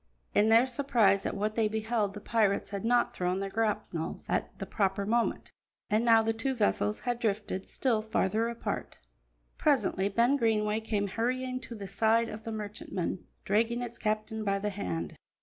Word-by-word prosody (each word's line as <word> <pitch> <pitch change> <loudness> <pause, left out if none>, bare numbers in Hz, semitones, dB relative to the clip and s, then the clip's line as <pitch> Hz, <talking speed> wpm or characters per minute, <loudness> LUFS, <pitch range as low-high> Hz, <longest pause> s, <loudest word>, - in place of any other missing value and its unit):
In 210 +2 +4
their 230 +3 +6
surprise 235 -7 +2
at - - -3
what 210 +2 -1
they 220 -1 +2
beheld 220 -1 -1
the 210 - -7
pirates 210 -3 +1
had 200 -1 -4
not 240 +1 +2
thrown 180 +1 0
their 195 0 -3
grapnels 210 -7 -2
at - - -2
the - - -5
proper 195 -1 0
moment, 235 +3 0 0.4
and 215 +2 +3
now 225 -1 +6
the 225 0 +1
two 260 +4 -2
vessels 210 -1 +1
had 245 -1 -2
drifted 205 -4 -2
still 235 -5 +1
farther 220 +1 0
apart. 235 0 -4 0.6
Presently 210 -9 +2
Ben 235 +7 +3
Greenway 215 -3 +1
came 210 -2 -1
hurrying 255 +4 -1
to 240 -2 -8
the 200 -2 -7
side 225 +4 +2
of 215 +1 -8
the 225 - -3
merchantman, 205 -4 -4 0.2
dragging 230 +4 +1
its 235 -1 -6
captain 215 0 -2
by 200 -1 +1
the 205 +1 -2
hand. 85 - -4
220 Hz, 175 wpm, -30 LUFS, 200-230 Hz, 0.6 s, their